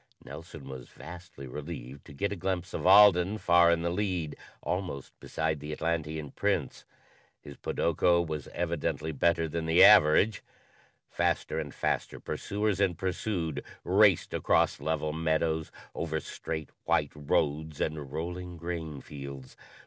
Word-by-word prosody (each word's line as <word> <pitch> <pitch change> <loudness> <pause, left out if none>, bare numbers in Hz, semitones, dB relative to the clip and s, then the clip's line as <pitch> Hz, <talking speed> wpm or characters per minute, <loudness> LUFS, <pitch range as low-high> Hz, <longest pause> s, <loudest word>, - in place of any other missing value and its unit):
Nelson 75 0 -10
was 65 -2 -8
vastly 85 -2 -10
relieved 70 -1 -8
to - - -12
get 100 +8 -2
a - - -2
glimpse 90 -1 -3
of - - -1
Alden 100 0 +7
far 85 -3 +5
in 85 0 +1
the 85 - 0
lead, 90 -5 -2 0.3
almost 90 -7 -3
beside 80 -1 -2
the 75 +2 -6
Atlantean 80 -2 -2
Prince. - - -1 0.5
His 70 - -11
podoko 85 +4 +1
was 75 -3 -5
evidently 85 -2 -2
better 80 +3 +2
than 80 +1 -3
the 80 +1 +6
average. 95 +7 +6 0.7
Faster - - -1
and - - -5
faster - - -2
pursuers 105 -1 -2
and 95 -4 +2
pursued 90 -4 -2 0.2
raced 100 0 +4
across - - +2
level 80 -1 -1
meadows, 80 0 0 0.2
over 80 -1 -2
straight, 80 -1 -6
white - - +2
roads 75 +1 -1
and 75 -3 -3
rolling 90 +3 -5
grain 80 -4 -5
fields. 70 -2 -9
80 Hz, 135 wpm, -29 LUFS, 75-90 Hz, 0.7 s, Alden